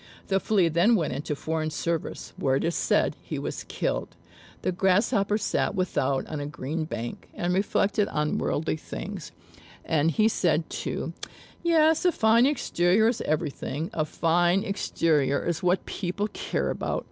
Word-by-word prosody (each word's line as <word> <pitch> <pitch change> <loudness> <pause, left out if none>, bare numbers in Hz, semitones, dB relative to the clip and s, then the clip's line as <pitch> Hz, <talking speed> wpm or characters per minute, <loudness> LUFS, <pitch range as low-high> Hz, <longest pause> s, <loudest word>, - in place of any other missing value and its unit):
The 195 0 +3
Flea 195 -4 +2
then 175 +9 +4
went 160 -9 0
into 145 +3 -3
foreign 155 +1 -2
service, 165 +1 -3
where, 135 -1 +1
it - - 0
is 170 - 0
said, - - +1
he - - -5
was - - -4
killed. - - -2 0.5
The - - +1
Grasshopper 200 +3 +2
sat - - 0
without 140 -7 0
on 155 - -5
a 145 - -4
green 150 +3 -3
bank, 120 -6 -6
and 175 +1 -1
reflected 200 +1 +1
on 150 0 -1
worldly 155 +1 -1
things; 180 +2 -7 0.5
and 160 -1 +2
he 215 +7 +3
said 170 -7 +1
too, - - -3 0.5
"Yes, 320 -2 +4
a 360 - +4
fine 230 -1 +4
exterior 220 -6 +2
is 235 - -2
everything 155 0 -2
a 155 - +1
fine 175 +4 +2
exterior 155 -8 +1
is 170 -1 -1
what 180 +1 +1
people 200 +2 -2
care - - -2
about." - - -2
175 Hz, 160 wpm, -26 LUFS, 155-200 Hz, 0.5 s, then